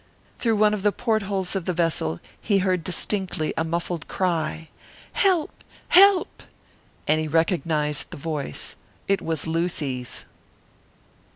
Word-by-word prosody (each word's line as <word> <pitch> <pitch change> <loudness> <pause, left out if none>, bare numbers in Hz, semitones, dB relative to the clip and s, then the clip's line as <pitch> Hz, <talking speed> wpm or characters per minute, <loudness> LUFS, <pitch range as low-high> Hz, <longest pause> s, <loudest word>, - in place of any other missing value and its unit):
Through 230 -2 +2
one 210 0 +4
of 210 - -2
the 205 +1 +3
portholes 200 -5 -1
of 190 -3 -2
the 180 - 0
vessel 155 - 0 0.2
he 205 -2 +2
heard 185 -3 +1
distinctly 185 -3 0
a 160 - 0
muffled 170 -1 -3
cry, 160 -3 -1 0.4
"Help! 365 -6 +1 0.3
help!" 390 0 +6 0.7
And 155 - +3
he 155 - -2
recognised 155 -2 0
the - - -8
voice. 145 - -4 0.3
It 195 0 +2
was 160 -2 -1
Lucy's! 160 -7 -2
170 Hz, 125 wpm, -24 LUFS, 155-200 Hz, 0.7 s, help